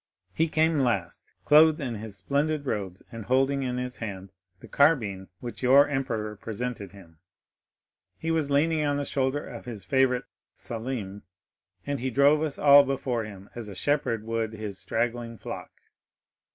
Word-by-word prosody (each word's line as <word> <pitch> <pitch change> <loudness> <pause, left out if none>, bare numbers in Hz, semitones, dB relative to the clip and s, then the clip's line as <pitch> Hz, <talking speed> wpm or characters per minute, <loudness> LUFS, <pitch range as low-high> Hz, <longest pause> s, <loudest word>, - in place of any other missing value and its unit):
He 160 - +2
came 160 0 +2
last, 100 -10 -1
clothed 155 +1 +6
in 130 -5 -3
his 105 -2 -7
splendid 145 +3 -1
robes 100 -7 -4
and 115 -2 -7
holding 135 +2 +2
in 125 -2 -2
his 125 0 -4
hand 95 -4 -6 0.3
the - - -13
carbine 110 -11 +2
which 120 -1 -7
your 135 +3 +6
emperor 115 -6 -2
presented 110 -2 -5
him. 85 -5 -16 1.0
He 165 - -2
was 160 -3 0
leaning 155 +2 +2
on 145 -1 +1
the 145 - -2
shoulder 135 +1 -1
of 120 -3 -9
his 115 -5 -8
favorite 130 -2 +2 0.3
Selim, 110 -4 -5 0.6
and 140 -1 -2
he 130 +2 -1
drove 140 +4 +4
us 155 -3 -2
all 145 -1 +8
before 130 -4 -2
him, 100 -2 -11
as 115 -3 -6
a 100 - -8
shepherd 125 -4 0
would 115 0 -2
his 105 -3 -6
straggling 115 0 -2
flock. - - -7
125 Hz, 160 wpm, -27 LUFS, 110-140 Hz, 1.0 s, all